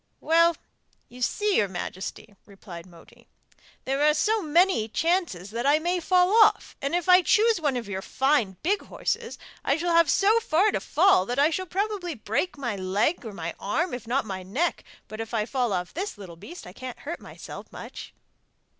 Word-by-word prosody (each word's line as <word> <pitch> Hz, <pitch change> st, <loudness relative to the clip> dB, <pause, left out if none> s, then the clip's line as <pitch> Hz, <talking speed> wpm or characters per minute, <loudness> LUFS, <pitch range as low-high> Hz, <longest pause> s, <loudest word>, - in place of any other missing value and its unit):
'Well, 335 Hz, +1 st, +3 dB, 0.5 s
you 250 Hz, +1 st, -13 dB
see, 415 Hz, +10 st, +1 dB
your 205 Hz, -, +3 dB
majesty,' 190 Hz, +3 st, -6 dB
replied 190 Hz, -4 st, -11 dB
Moti, 170 Hz, -2 st, -18 dB, 0.6 s
'there 270 Hz, +2 st, -1 dB
are 300 Hz, 0 st, +4 dB
so 435 Hz, +5 st, +1 dB
many 335 Hz, -, +2 dB
chances 310 Hz, -, -1 dB
that 235 Hz, +4 st, -2 dB
I 290 Hz, +2 st, +5 dB
may 350 Hz, +3 st, -1 dB
fall 360 Hz, +2 st, +3 dB
off, -, -, +1 dB
and 280 Hz, +4 st, -1 dB
if 355 Hz, +1 st, -1 dB
I 365 Hz, 0 st, +7 dB
choose 440 Hz, 0 st, +3 dB
one 285 Hz, -4 st, 0 dB
of 235 Hz, -4 st, -5 dB
your 190 Hz, -1 st, -4 dB
fine 260 Hz, -7 st, +1 dB
big 395 Hz, +5 st, +1 dB
horses -, -, -3 dB, 0.3 s
I 275 Hz, -, +1 dB
shall 340 Hz, +1 st, -1 dB
have 335 Hz, -2 st, +5 dB
so 425 Hz, +3 st, +4 dB
far 395 Hz, +1 st, +2 dB
to -, -, -1 dB
fall 305 Hz, -, +3 dB
that 245 Hz, -, -3 dB
I 295 Hz, +3 st, +4 dB
shall 370 Hz, +3 st, -3 dB
probably 385 Hz, -3 st, -2 dB
break 230 Hz, -, -2 dB
my 240 Hz, -6 st, -3 dB
leg 195 Hz, -, 0 dB
or 225 Hz, -, -6 dB
my 170 Hz, -3 st, -5 dB
arm, 335 Hz, -, -1 dB
if 245 Hz, -2 st, -6 dB
not 260 Hz, +2 st, 0 dB
my 190 Hz, -3 st, -5 dB
neck, 250 Hz, -, -2 dB, 0.2 s
but 215 Hz, +1 st, -7 dB
if 225 Hz, +1 st, -5 dB
I 210 Hz, -1 st, +1 dB
fall 250 Hz, -2 st, -1 dB
off 180 Hz, -2 st, -3 dB
this 385 Hz, -, -4 dB
little 185 Hz, -4 st, -10 dB
beast 340 Hz, -, -11 dB
I 180 Hz, -, -11 dB
can't 255 Hz, +2 st, -8 dB
hurt 330 Hz, +4 st, -5 dB
myself -, -, -10 dB
much. -, -, -9 dB
280 Hz, 195 wpm, -26 LUFS, 210-355 Hz, 0.6 s, I